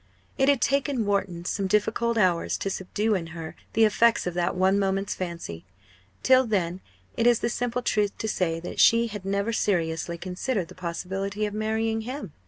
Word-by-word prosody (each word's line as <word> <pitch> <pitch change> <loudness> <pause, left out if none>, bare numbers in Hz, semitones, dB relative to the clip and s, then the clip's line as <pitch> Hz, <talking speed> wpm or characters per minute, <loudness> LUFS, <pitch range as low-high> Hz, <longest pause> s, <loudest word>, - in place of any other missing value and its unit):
It 270 0 +3
had 280 -3 +3
taken 275 -4 +1
Wharton 190 -4 -1
some 195 +1 -1
difficult 220 +3 +1
hours 180 -5 +2
to 195 - -3
subdue 210 +4 -1
in 175 -4 -1
her 160 -1 -7 0.2
the 225 0 +5
effects 230 +2 +3
of 180 - -2
that 175 +1 0
one 190 +2 +3
moment's 195 0 0
fancy. 170 - -6 0.6
Till 260 -1 +5
then 185 -4 -1 0.3
it 230 - +2
is 240 -2 +4
the 235 - +1
simple 245 +1 -2
truth 210 -3 0
to 220 - -3
say 170 -6 0
that 175 - -6
she 230 +1 +6
had 205 -3 -7
never 200 +3 0
seriously 170 -4 0
considered 185 +2 -3
the - - -11
possibility 190 +4 -3
of 205 - -4
marrying 220 +1 -1
him. 245 - -6
200 Hz, 185 wpm, -26 LUFS, 180-225 Hz, 0.6 s, she